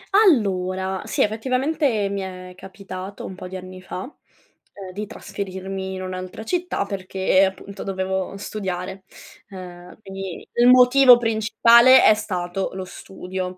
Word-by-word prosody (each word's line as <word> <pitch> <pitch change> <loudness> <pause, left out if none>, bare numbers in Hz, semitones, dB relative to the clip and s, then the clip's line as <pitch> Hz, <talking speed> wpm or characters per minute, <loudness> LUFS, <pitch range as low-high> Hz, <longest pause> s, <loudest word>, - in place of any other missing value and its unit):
Allora, 190 - +2
sì, - - +1
effettivamente 255 +1 0
mi 200 0 -3
è 185 -1 -8
capitato 190 +1 -9
un - - -7
po' 185 0 -9
di 185 +1 -7
anni 185 0 -10
fa, 185 0 -6 0.7
ehm, 195 -2 -9
di 210 +2 -5
trasferirmi 190 -2 -6
in 185 - -6
un'altra 185 +3 -6
città 355 - -2
perché 190 -1 +1
appunto 190 +1 -7
dovevo 190 0 -3
studiare. 190 -2 -5 0.4
Ehm, 180 -2 -11
quindi 195 -2 -8
il 240 +1 +4
motivo 250 0 +7
principale 235 +2 +5
è - - +7
stato 185 -2 -3
lo 190 0 -5
studio. 185 0 -7
190 Hz, 135 wpm, -22 LUFS, 185-215 Hz, 0.7 s, motivo